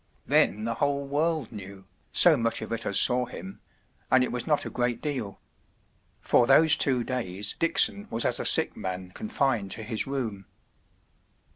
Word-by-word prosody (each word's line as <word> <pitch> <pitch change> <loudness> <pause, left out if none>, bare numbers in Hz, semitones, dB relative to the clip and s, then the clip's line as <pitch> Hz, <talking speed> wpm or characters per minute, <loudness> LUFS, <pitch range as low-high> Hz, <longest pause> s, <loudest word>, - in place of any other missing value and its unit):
Then 105 - +2
the 115 +1 -2
whole 140 +3 -2
world 150 0 -2
knew, 100 -2 -10 0.3
so - - +7
much 115 0 -1
of - - -9
it 115 0 -4
as 100 - +3
saw 125 0 +2
him—and 95 +7 -4
it - - -3
was 125 +4 -3
not 150 -2 0
a - - -5
great 120 -1 -2
deal. 130 -10 -5 0.8
For 120 - +2
those 155 +3 +6
two 130 -3 +1
days 105 -5 -3
Dickson 200 +5 +2
was 115 - +1
as - - 0
a - - -4
sick - - +3
man 95 0 -6
confined 135 - -2
to 110 - -7
his 110 +2 -4
room. 115 -8 -5
120 Hz, 165 wpm, -26 LUFS, 105-140 Hz, 0.8 s, so